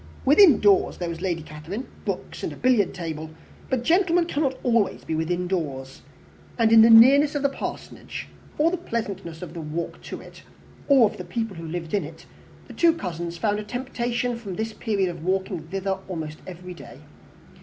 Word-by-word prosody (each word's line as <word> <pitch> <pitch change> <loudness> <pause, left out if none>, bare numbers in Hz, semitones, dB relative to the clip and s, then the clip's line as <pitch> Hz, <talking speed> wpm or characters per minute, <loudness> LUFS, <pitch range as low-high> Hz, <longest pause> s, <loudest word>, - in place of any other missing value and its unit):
Within 300 - +7
doors 200 -2 +3
there 175 -1 -3
was 165 0 -6
Lady 175 -4 -2
Catherine, 160 +11 -7 0.2
books, - - -4
and - - -3
a - - -8
billiard 245 -7 +2
table, 160 -3 -5 0.4
but 255 -2 0
gentlemen 350 +2 +3
cannot 285 -4 0
be - - -15
always 230 -5 +1
within 160 +3 -1
doors; 140 -8 -4 0.6
and 225 -2 +3
in 225 -1 +9
the 225 - +7
nearness 275 +6 +7
of 290 - -1
the 280 - +3
Parsonage, 275 - -7 0.3
or 320 +3 +3
the 365 - -1
pleasantness 200 - -5
of 165 -2 -8
the 170 - -6
walk 160 +2 -5
to - - -7
it, - - -13 0.5
or 270 -5 +6
of - - -8
the - - -6
people 225 -4 -4
who 165 0 -7
lived 165 +1 -5
in 205 - +1
it, 160 +2 -11 0.4
the - - -10
two 335 -1 +4
cousins 170 - -5
found 210 +3 0
a - - -4
temptation 245 +1 -2
from 200 -6 -7
this 220 +2 -3
period 205 -5 0
of 170 -2 -7
walking 190 -2 -2
thither 195 +1 -2
almost 155 -4 -5
every 180 0 -8
day. 170 - -12
195 Hz, 190 wpm, -24 LUFS, 170-245 Hz, 0.6 s, in